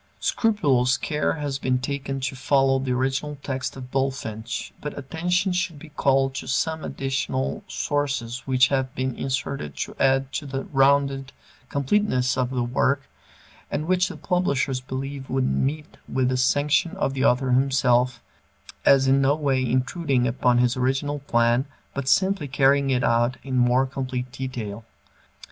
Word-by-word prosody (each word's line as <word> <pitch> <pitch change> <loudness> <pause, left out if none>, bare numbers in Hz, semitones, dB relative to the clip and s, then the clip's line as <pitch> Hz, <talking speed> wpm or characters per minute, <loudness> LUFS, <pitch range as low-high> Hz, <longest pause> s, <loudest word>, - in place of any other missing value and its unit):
Scrupulous 135 - +2
care 150 +2 -1
has 145 -3 -3
been 130 -1 +1
taken 135 +1 -3
to 130 0 -2
follow 135 0 +2
the 130 -1 -2
original 135 +3 -1
text 130 -1 -3
of 125 -1 -9
Bulfinch, 125 -5 -3
but 150 - -6
attention 180 +7 0
should 180 -3 -1
be 155 +2 -12
called 135 -2 +2
to - - -6
some 160 +4 -1
additional 130 - -2
sections 135 -4 -2
which 130 -1 +4
have 130 -2 -1
been 130 0 -1
inserted 130 - -3
to - - -4
add 135 0 +2
to 145 - -3
the 135 0 -3
rounded 135 -1 +2 0.4
completeness 140 -4 +1
of 130 -1 0
the 125 -2 -1
work, 135 +3 +1 0.7
and 150 - -2
which 180 +1 +2
the - - -8
publishers 140 -8 0
believe 135 +1 -6
would 130 0 +1
meet 150 +4 -2
with 130 -1 +1
the 130 - 0
sanction 145 +6 +2
of 135 - 0
the 135 -1 -1
author 130 -1 +3
himself, 125 -1 +2 0.6
as 135 -1 +5
in 135 +1 +4
no 135 +2 +3
way 135 -4 0
intruding 130 +2 0
upon 125 0 +2
his 120 0 +3
original 135 +3 0
plan 120 -1 +2 0.3
but 140 -1 -4
simply 190 +1 +2
carrying 140 0 +3
it 125 -2 +1
out 120 +2 +2
in 135 -2 -4
more 125 +1 +3
complete 130 -2 -4
detail. 115 -5 -5
135 Hz, 155 wpm, -24 LUFS, 125-140 Hz, 0.7 s, as